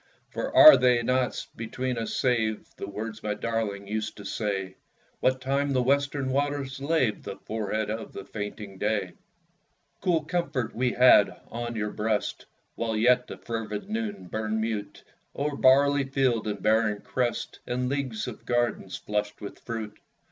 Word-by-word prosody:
For -, -, -3 dB
are 310 Hz, -1 st, +11 dB
they 125 Hz, -2 st, +3 dB
not 125 Hz, +1 st, 0 dB
between 125 Hz, +2 st, -3 dB
us 115 Hz, -, -3 dB
saved, 110 Hz, -4 st, 0 dB
The -, -, -5 dB
words 110 Hz, +2 st, -6 dB
my 105 Hz, -1 st, -2 dB
darling 105 Hz, -3 st, -2 dB
used 110 Hz, +1 st, -3 dB
to 100 Hz, -, -10 dB
say, 95 Hz, -3 st, -3 dB, 0.4 s
What 130 Hz, 0 st, +2 dB
time 140 Hz, +1 st, 0 dB
the 130 Hz, -1 st, +2 dB
western 140 Hz, 0 st, +1 dB
waters 140 Hz, -1 st, -1 dB
laved 140 Hz, -6 st, +1 dB
The 100 Hz, -, -6 dB
forehead 110 Hz, -1 st, -3 dB
of 110 Hz, +1 st, -5 dB
the -, -, -8 dB
fainting 105 Hz, -2 st, -6 dB
day? 105 Hz, -4 st, 0 dB, 0.9 s
Cool 170 Hz, -4 st, +2 dB
comfort 155 Hz, -7 st, -1 dB
had -, -, -20 dB
we 125 Hz, 0 st, 0 dB
on 120 Hz, -1 st, +4 dB
your 105 Hz, -1 st, -2 dB
breast 105 Hz, 0 st, -2 dB, 0.3 s
While 115 Hz, -2 st, -2 dB
yet 125 Hz, +3 st, +4 dB
the -, -, -8 dB
fervid 115 Hz, -, -5 dB
noon 220 Hz, -, -3 dB
burned 110 Hz, +3 st, -2 dB
mute 110 Hz, -2 st, -3 dB, 0.3 s
O'er 145 Hz, +1 st, -1 dB
barley 140 Hz, +1 st, +5 dB
field 130 Hz, -5 st, +1 dB
and 105 Hz, -2 st, -4 dB
barren 110 Hz, -1 st, +2 dB
crest, 125 Hz, -2 st, -2 dB
And 125 Hz, +1 st, -1 dB
leagues 130 Hz, -5 st, -2 dB
of 120 Hz, -, -8 dB
gardens 120 Hz, -6 st, -1 dB
flushed 105 Hz, 0 st, -3 dB
with 105 Hz, -, -8 dB
fruit. 115 Hz, -3 st, -6 dB
115 Hz, 155 wpm, -27 LUFS, 105-130 Hz, 0.9 s, are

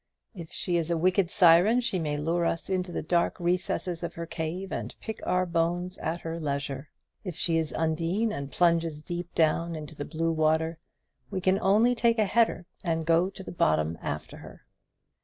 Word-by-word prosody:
If 170 Hz, -6 st, -9 dB
she 175 Hz, -1 st, -1 dB
is 165 Hz, -1 st, -1 dB
a 170 Hz, -, +1 dB
wicked 185 Hz, +2 st, +2 dB
siren, 180 Hz, +8 st, +6 dB
she 235 Hz, -6 st, 0 dB
may 150 Hz, -3 st, -1 dB
lure 165 Hz, +3 st, 0 dB
us 165 Hz, +2 st, -1 dB
into 180 Hz, -1 st, -1 dB
the -, -, -3 dB
dark 170 Hz, +3 st, +1 dB
recesses 175 Hz, 0 st, -1 dB
of 170 Hz, -, -5 dB
her 170 Hz, -, -4 dB
cave 165 Hz, +3 st, -4 dB
and -, -, -4 dB
pick 220 Hz, -1 st, -6 dB
our 185 Hz, 0 st, +2 dB
bones 175 Hz, +2 st, -1 dB
at 165 Hz, +2 st, -3 dB
her 165 Hz, 0 st, -4 dB
leisure. 140 Hz, -2 st, -3 dB, 0.3 s
If 180 Hz, -6 st, -5 dB
she 165 Hz, -1 st, +1 dB
is 160 Hz, -2 st, -2 dB
Undine, 165 Hz, +7 st, 0 dB
and 140 Hz, -7 st, -4 dB
plunges 165 Hz, -3 st, +1 dB
deep 175 Hz, +1 st, -5 dB
down 165 Hz, +1 st, +2 dB
into 155 Hz, 0 st, -7 dB
the 145 Hz, -, -5 dB
blue 165 Hz, +1 st, -1 dB
water, 160 Hz, +1 st, +1 dB, 0.5 s
we -, -, -2 dB
can 185 Hz, +1 st, +2 dB
only 215 Hz, +6 st, +4 dB
take 235 Hz, -1 st, +2 dB
a 215 Hz, -, +3 dB
header 225 Hz, -3 st, +2 dB, 0.2 s
and 165 Hz, -2 st, -1 dB
go 170 Hz, +3 st, +3 dB
to 195 Hz, 0 st, -10 dB
the -, -, -7 dB
bottom 80 Hz, -, +1 dB
after -, -, -5 dB
her. -, -, -13 dB
170 Hz, 195 wpm, -28 LUFS, 160-185 Hz, 0.5 s, siren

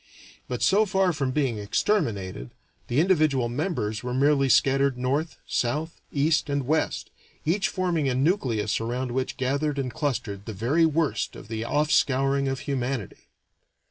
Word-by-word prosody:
But, 125 Hz, -2 st, -3 dB
so 210 Hz, +3 st, +4 dB
far 190 Hz, -2 st, +2 dB
from 140 Hz, -3 st, -1 dB
being 130 Hz, -5 st, 0 dB
exterminated, 100 Hz, -, -1 dB, 0.4 s
the 120 Hz, -, +1 dB
individual 155 Hz, -8 st, +3 dB
members 120 Hz, -, -2 dB
were 125 Hz, 0 st, -3 dB
merely 140 Hz, 0 st, +3 dB
scattered 135 Hz, 0 st, +3 dB
north, 140 Hz, +6 st, -1 dB
south, 150 Hz, +7 st, -2 dB
east, 150 Hz, +2 st, +1 dB
and 140 Hz, -2 st, -1 dB
west, 155 Hz, +4 st, -1 dB, 0.3 s
each 185 Hz, +6 st, +2 dB
forming 170 Hz, -6 st, 0 dB
a 125 Hz, -, 0 dB
nucleus 130 Hz, -, +1 dB
around 125 Hz, +2 st, -2 dB
which 130 Hz, +1 st, -2 dB
gathered 140 Hz, +3 st, 0 dB
and 130 Hz, -3 st, -2 dB
clustered 115 Hz, -8 st, -3 dB
the 110 Hz, -, -4 dB
very 135 Hz, -, +2 dB
worst 160 Hz, -1 st, -1 dB
of -, -, -11 dB
the 110 Hz, -1 st, -3 dB
offscouring 140 Hz, -1 st, +2 dB
of 135 Hz, -1 st, -2 dB
humanity. 130 Hz, -, -4 dB
135 Hz, 145 wpm, -26 LUFS, 120-155 Hz, 0.4 s, so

